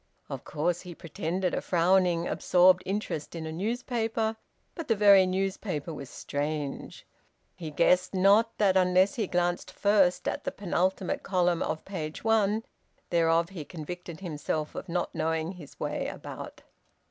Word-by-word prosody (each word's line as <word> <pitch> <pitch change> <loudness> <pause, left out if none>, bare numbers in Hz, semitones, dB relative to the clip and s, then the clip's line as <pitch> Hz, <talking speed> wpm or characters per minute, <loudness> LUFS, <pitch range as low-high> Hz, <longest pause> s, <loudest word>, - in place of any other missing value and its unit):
Of - - -6
course 170 +3 -1
he 180 -2 -9
pretended 170 +3 -3
a - - -1
frowning, 175 -1 +2
absorbed 180 +1 +4
interest 190 -6 -3
in 165 -1 -5
a 160 - -4
newspaper 225 +3 -1 0.4
but 330 -4 -6
the 225 - +3
very 200 -2 +7
newspaper 185 -4 -2
was 140 -3 -8
strange; 145 +1 -4 0.5
he 165 -4 -6
guessed 180 +5 +3
not 200 +5 +4
that 195 -3 +3
unless 185 +1 +4
he 220 -5 -2
glanced 175 0 0
first 200 -3 +2
at - - -2
the - - -2
penultimate 185 -1 -1
column 180 -3 +1
of 155 0 -3
page 160 -5 -5
one 220 -1 +2 0.5
thereof 165 0 +3
he 180 -6 -7
convicted 170 +2 -8
himself 155 -3 -3
of 190 - -7
not 175 +1 -2
knowing 160 +1 -1
his 175 -7 -12
way - - -2
about. - - -8
180 Hz, 145 wpm, -28 LUFS, 165-195 Hz, 0.5 s, very